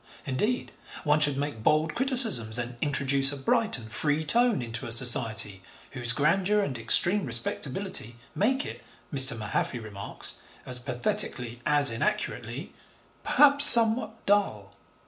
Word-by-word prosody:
Indeed, 210 - -4 0.3
one 150 -2 0
should 145 -2 +1
make 145 -5 -6
bold 155 +6 -1
criticisms 230 - +1
and 120 0 -5
introduce 140 -1 0
a 145 - -7
bright 225 - -2
and 110 -2 -12
free 150 +4 -2
tone 235 - 0
into 115 -1 -7
a - - -9
Society 115 -5 +2 0.3
whose 120 -3 +2
grandeur 185 - -1
and 140 -10 -5
extreme 175 - +2
respectability 125 - -3 0.2
make 265 +7 -2
it, - - -10 0.3
Mr. 130 -4 +4
Mahaffy 110 +3 -5
remarks, 105 -3 -5 0.3
as 125 -1 -2
pathetically 120 -1 -2
as 145 -2 +3
inaccurately, 210 - -6 0.5
'perhaps 285 0 +4
somewhat 230 -2 +6
dull.' 195 - -2
140 Hz, 130 wpm, -24 LUFS, -, 0.5 s, somewhat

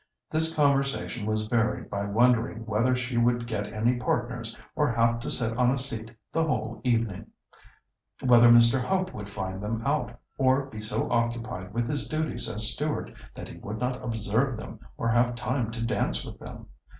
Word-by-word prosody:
This 160 +1 +5
conversation 135 -6 +1
was 110 0 0
varied 115 0 0
by 100 0 -3
wondering 115 +1 +2
whether 115 +4 +2
she 125 -1 -3
would 120 0 +2
get 105 -3 -3
any 115 +3 +1
partners, 120 -1 -2 0.2
or 150 -4 +2
have 115 0 +2
to - - -5
sit 115 -1 -1
on 125 0 +3
a 135 - +1
seat 115 -4 -4 0.2
the 165 - +2
whole 115 -8 -2
evening; 115 -6 0 0.9
whether 120 -2 +6
Mr. 120 +2 +6
Hope 185 +3 -1
would 105 -1 -7
find 95 -1 -5
them 110 +2 -3
out, - - -1 0.2
or 135 +1 +3
be 110 -6 -9
so 105 +1 -2
occupied 115 -5 -1
with 115 +2 -1
his 145 0 -2
duties 155 0 -2
as 110 +2 +2
steward 150 0 -3 0.2
that - - -7
he - - -10
would 105 +2 -6
not 125 +2 -2
observe 115 +3 0
them 110 0 -9 0.2
or 115 - -2
have 120 +1 +2
time 125 -1 -1
to 115 0 -4
dance 115 - 0
with - - -9
them. - - -10
120 Hz, 180 wpm, -27 LUFS, 110-125 Hz, 0.9 s, whether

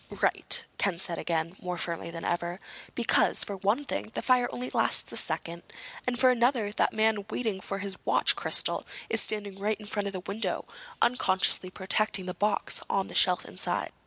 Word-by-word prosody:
"Right," - - +3
Ken 195 -4 +1
said 170 -1 0
again, 165 +1 -2
more 180 -1 -4
firmly 170 -1 -3
than 165 0 -7
ever. 175 +1 -2 0.4
"Because, - - +3
for 200 - -5
one 205 +9 0
thing, 240 - -3
the - - -3
fire 250 -1 +3
only 250 +1 -4
lasts - - +1
a - - -6
second. 170 +1 -3 0.5
And, 250 -1 0
for 260 -1 +6
another, 240 -3 +2
that - - +1
man 220 -1 +2
waiting 215 -4 -2
for 195 - -4
his 195 -1 -5
watch - - +3
crystal - - +2 0.3
is - - +5
standing 205 -2 -2
right 210 +2 -1
in 210 - -10
front 205 -1 -2
of 200 - -4
the 185 - -4
window, 200 +4 -3 0.4
unconsciously 190 -6 +2
protecting 190 +1 0
the 180 - -4
box 210 +2 0
on 195 -1 0
the - - -9
shelf 180 -1 +3
inside. 85 +2 -2
200 Hz, 190 wpm, -28 LUFS, 180-220 Hz, 0.5 s, for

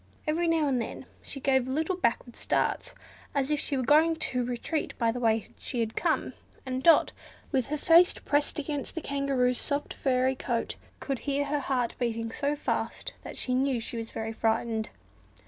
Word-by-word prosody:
Every 330 +3 +1
now 325 -2 +3
and 255 -3 +1
then 230 - -6 0.2
she 275 - -7
gave 265 -1 +2
little 315 +7 0
backward 240 -6 0
starts, - - 0 0.4
as 275 +1 +1
if 300 - +2
she 280 - 0
were 260 - 0
going 315 +5 +5
to 250 -5 0
retreat 250 +6 -3
by 230 -2 +2
the 245 - -4
way 225 -2 +1
she 245 - -4
had 225 -1 -1
come, - - 0 0.3
and 260 0 -2
Dot, 330 +3 +6 0.4
with 260 -3 +1
her 300 +2 -2
face 340 +3 +6
pressed 290 0 0
against 290 0 -3
the 325 - -3
Kangaroo's 275 -3 +1
soft 285 0 -2
furry 260 -1 +2
coat, 240 -2 -2 0.2
could 270 -3 -3
hear 285 0 0
her 290 +1 0
heart 255 -3 0
beating 230 -2 -1
so 290 +4 -1
fast 290 - -2
that - - -8
she 255 - -1
knew 260 -1 +2
she 230 +1 -5
was 225 0 -5
very 225 0 -4
frightened. 225 0 0
265 Hz, 185 wpm, -28 LUFS, 240-295 Hz, 0.4 s, Dot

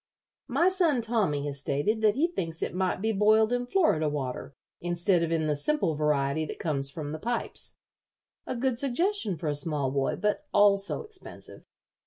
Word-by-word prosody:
My 290 +7 +2
son, 335 -10 +2
Tommy, 200 -11 0
has 140 -1 -4
stated 145 +11 0
that 215 -1 +4
he 295 +5 +3
thinks 165 - -3
it - - -3
might 185 +1 -1
be 220 - +2
boiled 215 +2 +4
in 245 0 -1
Florida 245 - +2
water 135 -2 -4 0.2
instead 175 +1 +1
of 165 -1 -1
in 160 -1 +1
the 150 -1 +1
simple 195 - 0
variety 150 0 +1
that - - -6
comes 140 -4 -1
from 145 0 -6
the 155 - -5
pipes. 240 +7 -3 0.7
A - - -2
good 250 0 0
suggestion 280 - 0
for 160 - -4
a 150 - +1
small 145 -2 -1
boy, 135 0 0
but 210 +10 -1
also 200 - +3
expensive. 430 -3 -9
185 Hz, 180 wpm, -28 LUFS, 150-240 Hz, 0.7 s, that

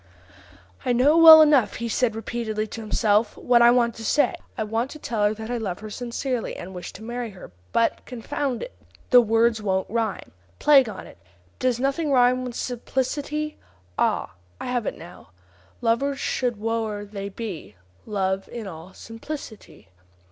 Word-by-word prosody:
"I 250 - +1
know 265 +6 +4
well 320 -1 +10
enough," 290 -6 +3
he 235 - -4
said 230 0 0
repeatedly 220 -1 -3
to 225 +1 -8
himself, 215 0 +1
"what 240 -1 +3
I 235 - +8
want 240 -1 +3
to 225 - -10
say. 290 +10 +2 0.2
I - - -1
want 225 +4 -2
to 305 - -9
tell 235 -7 -3
her 210 - +2
that 220 +2 -7
I 245 - -1
love 190 -5 -3
her 215 -1 -8
sincerely, 245 +1 -3
and 185 +2 -8
wish 180 -1 -7
to 220 - -11
marry 240 +1 -4
her; 190 - -12 0.2
but, 230 - +1
confound 255 +1 -3
it! - - -8 0.4
the 250 -1 +9
words 225 0 +2
won't 190 -2 -1
rhyme. 225 -2 -2 0.3
Plague 275 -5 +5
on 205 - -8
it! - - -15 0.4
Does 250 -2 0
nothing 275 +3 0
rhyme 255 -1 +4
with 250 -2 -6
'simplicity'? 280 +5 -3 0.4
Ah! - - 0 0.3
I - - -6
have 245 -3 -2
it - - -3
now: 170 - -13 0.5
'Lovers 270 +4 0
should, 250 -3 -1
whoe'er 220 -1 -3
they 200 -1 -6
be, 190 - -7 0.3
Love 195 -2 -2
in 235 -2 -7
all 175 0 -10
simplicity. 225 - -9
230 Hz, 170 wpm, -24 LUFS, 215-255 Hz, 0.5 s, well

